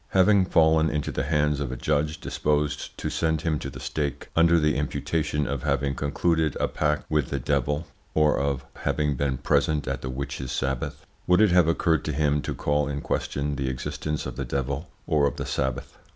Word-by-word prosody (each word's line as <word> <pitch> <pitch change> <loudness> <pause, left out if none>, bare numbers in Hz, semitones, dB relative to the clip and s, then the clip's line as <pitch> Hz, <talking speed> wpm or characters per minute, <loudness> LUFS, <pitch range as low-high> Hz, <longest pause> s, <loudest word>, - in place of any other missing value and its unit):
Having 95 0 +5
fallen 80 -2 +4
into 75 0 -2
the 65 - -2
hands 75 -1 +1
of 70 -4 -2
a - - -3
judge 75 +6 0
disposed 75 0 -1
to - - -3
send 80 -2 0
him 80 -2 0
to 70 - -5
the - - -9
stake, 70 -2 -3
under 85 0 +5
the 75 -2 +2
imputation 75 +1 -1
of 70 -2 -2
having 70 -1 0
concluded 80 +2 0
a - - +2
pact 75 0 0
with 75 -5 0
the 70 - -1
devil, 70 +4 0 0.3
or 75 -1 +4
of 70 -1 -1
having 75 -1 0
been 70 0 -1
present 75 +2 +1
at 65 -2 -2
the 65 - -4
witches 65 0 -4
sabbath, 65 -2 -2 0.2
would 90 +1 +5
it 105 -3 +5
have 90 -2 +5
occurred 80 -2 +2
to 75 - -1
him 75 0 +1
to - - -4
call 75 -1 +1
in 70 0 -3
question 70 0 -2
the 65 -1 -1
existence 75 +4 -3
of - - -6
the 70 - -2
devil 70 +4 -3 0.2
or 75 -2 +3
of 70 - -3
the - - -4
sabbath? 65 -3 -3
75 Hz, 200 wpm, -26 LUFS, 70-80 Hz, 0.3 s, Having